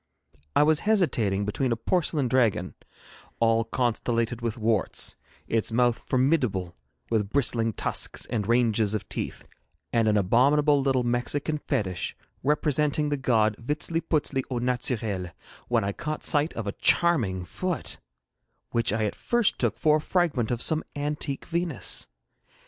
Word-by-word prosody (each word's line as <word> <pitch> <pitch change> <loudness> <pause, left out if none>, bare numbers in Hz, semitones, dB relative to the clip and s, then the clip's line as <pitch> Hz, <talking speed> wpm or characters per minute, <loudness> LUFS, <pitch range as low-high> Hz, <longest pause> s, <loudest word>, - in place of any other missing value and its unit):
I 145 - +6
was 155 +1 +3
hesitating 115 - +2
between 120 +5 -1
a - - +2
porcelain 150 +2 0
dragon, 115 -8 +1 0.7
all 115 0 +3
constellated 115 0 -1
with 115 0 -2
warts, 110 -3 0 0.3
its 115 0 0
mouth 120 0 +2
formidable 125 - +1 0.4
with 105 -3 +1
bristling 115 -3 +1
tusks - - -1
and 105 -4 -2
ranges 115 -3 +2
of 105 - -4
teeth, - - -5 0.5
and 115 -2 +3
an 105 -1 +3
abominable 140 +9 +4
little 135 -2 +1
Mexican 130 +5 -1
fetich, 95 -10 -2 0.2
representing 150 +1 +1
the 145 - +1
god 110 -5 +2
Vitziliputzili 150 +1 -1
au 125 - -2
naturel, 115 -7 -2 0.4
when - - +2
I 100 - -1
caught 155 +9 -5
sight 150 +2 +2
of 115 - -4
a 100 - -1
charming 110 - +2
foot, 180 - -4 0.7
which 115 -2 +1
I 110 +1 0
at 105 - -2
first 240 -3 0
took 115 -3 0
for 150 +4 +4
a - - -4
fragment 155 -10 0
of 120 -1 -1
some 160 -1 +1
antique 145 -1 -3
Venus. 165 - -1
120 Hz, 140 wpm, -26 LUFS, 110-150 Hz, 0.7 s, I